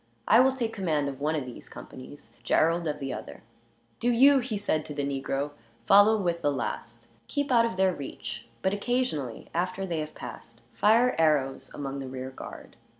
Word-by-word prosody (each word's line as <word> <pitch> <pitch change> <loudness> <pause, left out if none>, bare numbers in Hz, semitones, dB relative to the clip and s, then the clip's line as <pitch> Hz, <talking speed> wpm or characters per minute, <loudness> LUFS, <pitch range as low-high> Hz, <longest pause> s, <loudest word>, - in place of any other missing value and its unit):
I 225 - +7
will 265 +1 +6
take 235 -4 -2
command 155 -8 0
of 135 0 -8
one 155 +2 +1
of 145 -4 -2
these 125 - -10
companies, 130 +3 -11
Gerald 165 +1 +2
of 150 - -2
the 135 -2 -4
other. - - -8 0.6
"Do 240 - +1
you," 270 +4 +6
he 240 -4 -3
said 160 -6 0
to 150 - -7
the 145 - -1
negro, 140 +1 -2 0.3
"follow 205 +2 +6
with 170 -3 -1
the 145 - +2
last. 140 - -5 0.2
Keep 285 -2 -2
out 230 -2 +5
of 185 - -6
their 190 -1 +3
reach; 120 -6 -7 0.2
but 190 - +2
occasionally, 205 - -2
after 185 +3 -1
they 170 -4 -2
have 155 0 -5
passed, - - -10
fire 230 +4 +4
arrows 145 -4 +1
among 140 -1 -5
the 135 - -5
rear 130 0 -6
guard. - - -10
165 Hz, 190 wpm, -28 LUFS, 140-220 Hz, 0.6 s, I